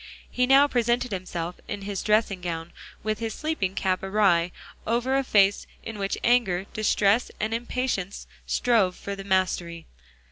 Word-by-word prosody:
He 250 Hz, 0 st, +1 dB
now 275 Hz, +2 st, +6 dB
presented 240 Hz, -1 st, 0 dB
himself 180 Hz, -2 st, -4 dB
in 205 Hz, -1 st, -5 dB
his 200 Hz, -1 st, -3 dB
dressing 210 Hz, -3 st, +1 dB
gown, 165 Hz, -1 st, -5 dB, 0.3 s
with 215 Hz, 0 st, -1 dB
his 225 Hz, -1 st, -3 dB
sleeping 305 Hz, -12 st, -2 dB
cap 185 Hz, -1 st, 0 dB
awry, 190 Hz, -4 st, +2 dB, 0.4 s
over 240 Hz, +4 st, +1 dB
a 275 Hz, -, +2 dB
face 200 Hz, -5 st, +3 dB, 0.2 s
in 225 Hz, -2 st, -7 dB
which 195 Hz, 0 st, -1 dB
anger, 225 Hz, -7 st, +3 dB
distress 215 Hz, +1 st, +2 dB
and 215 Hz, +1 st, -1 dB
impatience 235 Hz, -5 st, -2 dB, 0.2 s
strove 215 Hz, -7 st, +2 dB
for 200 Hz, -, -6 dB
the 195 Hz, -, -8 dB
mastery. 180 Hz, -3 st, -1 dB
205 Hz, 150 wpm, -26 LUFS, 185-235 Hz, 0.4 s, now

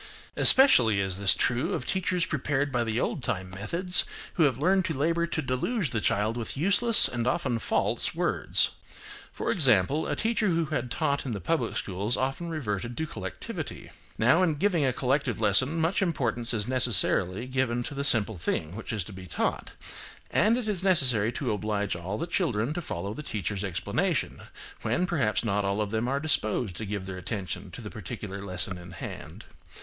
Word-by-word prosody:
Especially 125 Hz, -, +7 dB
is 95 Hz, -1 st, -1 dB
this 100 Hz, -1 st, +5 dB
true 120 Hz, 0 st, 0 dB
of 125 Hz, -, -5 dB
teachers 185 Hz, -2 st, 0 dB
prepared 145 Hz, -3 st, -1 dB
by 120 Hz, -2 st, 0 dB
the 115 Hz, 0 st, -2 dB
old 140 Hz, -, -2 dB
time 95 Hz, -6 st, -3 dB
methods, 170 Hz, -, +1 dB, 0.3 s
who 165 Hz, -, +3 dB
have 130 Hz, -5 st, +1 dB
learned 185 Hz, +6 st, +2 dB
to 160 Hz, -, -2 dB
labour 170 Hz, +4 st, 0 dB
to 160 Hz, -2 st, -3 dB
deluge 135 Hz, -, -1 dB
the 110 Hz, -, -1 dB
child 105 Hz, +4 st, 0 dB
with 115 Hz, +2 st, -4 dB
useless, 200 Hz, -, +6 dB
and 120 Hz, -1 st, -3 dB
often, 130 Hz, -6 st, -1 dB
false -, -, -1 dB
words. -, -, +1 dB, 0.6 s
For -, -, -3 dB
example, 135 Hz, -, +3 dB
a -, -, -1 dB
teacher 225 Hz, -1 st, 0 dB
who 170 Hz, -2 st, +1 dB
had 140 Hz, -5 st, -3 dB
taught 145 Hz, 0 st, -1 dB
in 130 Hz, -, -4 dB
the 100 Hz, -, -4 dB
public 120 Hz, -, -2 dB
schools 100 Hz, +5 st, -2 dB
often 135 Hz, +6 st, -3 dB
reverted 120 Hz, -, -4 dB
to 160 Hz, -, -2 dB
collectivity. 95 Hz, -, -7 dB, 0.3 s
Now 130 Hz, +10 st, +4 dB
in 165 Hz, -4 st, +2 dB
giving 170 Hz, 0 st, +1 dB
a 130 Hz, -, +2 dB
collective 130 Hz, -1 st, -1 dB
lesson 130 Hz, +9 st, +3 dB
much 165 Hz, +5 st, +1 dB
importance 120 Hz, -, 0 dB
is 105 Hz, -3 st, 0 dB
necessarily 120 Hz, -5 st, +3 dB
given 130 Hz, -2 st, -1 dB
to 145 Hz, -, -6 dB
the 140 Hz, 0 st, -3 dB
simple 110 Hz, -8 st, +5 dB
thing 85 Hz, 0 st, -3 dB
which 110 Hz, -, -7 dB
is 105 Hz, -4 st, -2 dB
to 100 Hz, -, -11 dB
be 95 Hz, -1 st, -10 dB
taught, 80 Hz, -, -3 dB, 0.6 s
and 220 Hz, +3 st, +3 dB
it 245 Hz, -3 st, -4 dB
is 195 Hz, -4 st, -1 dB
necessary 125 Hz, -, +4 dB
to 130 Hz, -, -2 dB
oblige 105 Hz, -1 st, -2 dB
all 90 Hz, +4 st, -5 dB
the -, -, -3 dB
children 130 Hz, -, -1 dB
to 175 Hz, -, -4 dB
follow 100 Hz, -, -5 dB
the 135 Hz, -, -7 dB
teacher's 100 Hz, -, -4 dB
explanation, 90 Hz, -3 st, -2 dB, 0.4 s
when 180 Hz, -, 0 dB
perhaps 120 Hz, -, 0 dB
not 105 Hz, -1 st, 0 dB
all 100 Hz, +1 st, -1 dB
of 105 Hz, -1 st, -2 dB
them 110 Hz, +2 st, -1 dB
are 135 Hz, +2 st, -1 dB
disposed 115 Hz, -, 0 dB
to 110 Hz, -, -5 dB
give 100 Hz, -2 st, -4 dB
their 95 Hz, -1 st, -6 dB
attention 95 Hz, -1 st, -5 dB
to 90 Hz, +7 st, -10 dB
the 105 Hz, -, -8 dB
particular 100 Hz, -1 st, -7 dB
lesson 90 Hz, -1 st, -4 dB
in 90 Hz, 0 st, -12 dB
hand. 85 Hz, -, -9 dB
120 Hz, 190 wpm, -27 LUFS, 100-155 Hz, 0.6 s, Especially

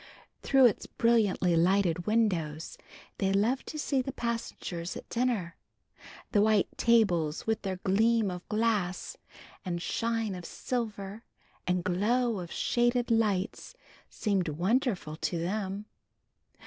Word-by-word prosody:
Through 270 Hz, -1 st, +5 dB
its 235 Hz, -, +2 dB
brilliantly 215 Hz, -7 st, +2 dB
lighted 175 Hz, 0 st, +2 dB
windows 175 Hz, -9 st, 0 dB, 0.4 s
they 195 Hz, -1 st, +1 dB
loved 220 Hz, +7 st, +1 dB
to 310 Hz, -, -6 dB
see 280 Hz, -3 st, 0 dB
the 270 Hz, -, -4 dB
passengers 230 Hz, -8 st, -4 dB
at -, -, -10 dB
dinner. 230 Hz, -8 st, -1 dB, 0.7 s
The 205 Hz, -, +4 dB
white 215 Hz, -2 st, +2 dB
tables 180 Hz, -10 st, +2 dB
with 220 Hz, 0 st, 0 dB
their 190 Hz, -2 st, -2 dB
gleam 220 Hz, +1 st, +3 dB
of 180 Hz, 0 st, -8 dB
glass 210 Hz, -, 0 dB, 0.5 s
and 175 Hz, -2 st, -3 dB
shine 225 Hz, +2 st, -1 dB
of 180 Hz, -1 st, -7 dB
silver 215 Hz, 0 st, -4 dB, 0.4 s
and 180 Hz, -1 st, +1 dB
glow 215 Hz, +5 st, +1 dB
of 175 Hz, -2 st, -7 dB
shaded 240 Hz, 0 st, +1 dB
lights 210 Hz, -, 0 dB, 0.3 s
seemed 195 Hz, -5 st, 0 dB
wonderful 185 Hz, -, 0 dB
to 170 Hz, -, -2 dB
them. 195 Hz, +3 st, -3 dB
205 Hz, 120 wpm, -29 LUFS, 180-230 Hz, 0.7 s, Through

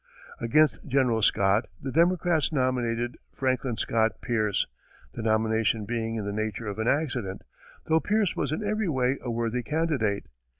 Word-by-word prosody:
Against 150 Hz, +8 st, +2 dB
General 125 Hz, -4 st, +2 dB
Scott, 100 Hz, +2 st, +3 dB
the 135 Hz, -, -5 dB
Democrats 170 Hz, -1 st, +2 dB
nominated 125 Hz, -3 st, 0 dB
Franklin 130 Hz, -3 st, -1 dB
Scott 110 Hz, -1 st, +1 dB
Pierce, 110 Hz, -4 st, 0 dB, 0.5 s
the -, -, -5 dB
nomination 110 Hz, 0 st, +1 dB
being 115 Hz, 0 st, -2 dB
in 110 Hz, -2 st, -3 dB
the 100 Hz, -, -3 dB
nature 110 Hz, +1 st, -3 dB
of 105 Hz, 0 st, -4 dB
an 110 Hz, -, 0 dB
accident, 125 Hz, -10 st, -1 dB, 0.4 s
though 160 Hz, 0 st, +3 dB
Pierce 205 Hz, +3 st, +1 dB
was 140 Hz, -, -1 dB
in 155 Hz, -, -2 dB
every 215 Hz, -2 st, 0 dB
way 130 Hz, -2 st, +1 dB
a 125 Hz, -, -5 dB
worthy 115 Hz, +1 st, -1 dB
candidate. 140 Hz, -8 st, 0 dB
120 Hz, 155 wpm, -27 LUFS, 110-150 Hz, 0.5 s, Scott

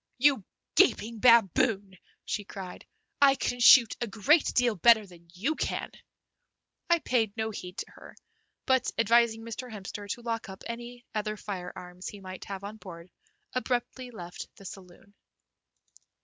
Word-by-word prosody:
"You 270 Hz, -4 st, +3 dB, 0.3 s
gaping 225 Hz, +1 st, +3 dB
baboon," 205 Hz, -3 st, +4 dB, 0.3 s
she 210 Hz, -, -2 dB
cried, 190 Hz, -2 st, -9 dB, 0.3 s
"I 275 Hz, -1 st, +7 dB
can 245 Hz, -2 st, -2 dB
shoot 240 Hz, -1 st, +7 dB
a 240 Hz, -, -1 dB
great 225 Hz, -, +3 dB
deal 245 Hz, -2 st, +3 dB
better 220 Hz, +3 st, +5 dB
than 170 Hz, -3 st, -17 dB
you 210 Hz, -, -1 dB
can!" -, -, -3 dB, 1.0 s
I 340 Hz, -, +5 dB
paid 230 Hz, -8 st, 0 dB
no 220 Hz, 0 st, -1 dB
heed 180 Hz, -3 st, -8 dB
to -, -, -6 dB
her, -, -, -14 dB, 0.5 s
but, 260 Hz, -1 st, +2 dB
advising 230 Hz, 0 st, +3 dB
Mr. 230 Hz, +2 st, -7 dB
Hemster 205 Hz, 0 st, -8 dB
to 240 Hz, -, -4 dB
lock 230 Hz, -3 st, -3 dB
up 190 Hz, -, -10 dB
any 240 Hz, +1 st, -7 dB
other 215 Hz, 0 st, -2 dB
firearms 180 Hz, -2 st, -7 dB
he 205 Hz, -, -8 dB
might 185 Hz, -1 st, -9 dB
have 195 Hz, -1 st, -7 dB
on 210 Hz, +2 st, -7 dB
board, 175 Hz, -4 st, -11 dB, 0.4 s
abruptly 255 Hz, 0 st, -2 dB
left 180 Hz, -7 st, -8 dB
the 195 Hz, -, -15 dB
saloon. 190 Hz, +1 st, -12 dB
220 Hz, 150 wpm, -28 LUFS, 195-240 Hz, 1.0 s, I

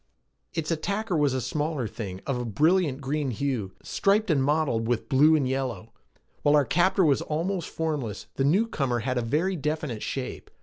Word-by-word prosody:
Its 165 Hz, 0 st, -2 dB
attacker 200 Hz, +5 st, -1 dB
was 145 Hz, -3 st, +3 dB
a -, -, 0 dB
smaller 150 Hz, -1 st, -2 dB
thing 95 Hz, -4 st, -6 dB
of 135 Hz, -, -1 dB
a -, -, -2 dB
brilliant 150 Hz, -, +2 dB
green 140 Hz, +1 st, -1 dB
hue, 120 Hz, -5 st, -2 dB
striped 205 Hz, 0 st, +2 dB
and 140 Hz, -4 st, +2 dB
mottled 140 Hz, -6 st, +1 dB
with 115 Hz, -2 st, -1 dB
blue 150 Hz, +5 st, +5 dB
and 140 Hz, -4 st, +1 dB
yellow. 130 Hz, -4 st, -3 dB, 0.5 s
While 145 Hz, 0 st, +4 dB
our 145 Hz, -2 st, +4 dB
captor 185 Hz, +4 st, +3 dB
was 140 Hz, -3 st, +3 dB
almost 170 Hz, +3 st, -2 dB
formless, 145 Hz, -10 st, -3 dB
the 135 Hz, -, -1 dB
newcomer 140 Hz, -, +1 dB
had 125 Hz, +1 st, -1 dB
a -, -, 0 dB
very 155 Hz, +11 st, 0 dB
definite 150 Hz, -7 st, -3 dB
shape. 130 Hz, -2 st, -5 dB
145 Hz, 175 wpm, -26 LUFS, 125-160 Hz, 0.5 s, blue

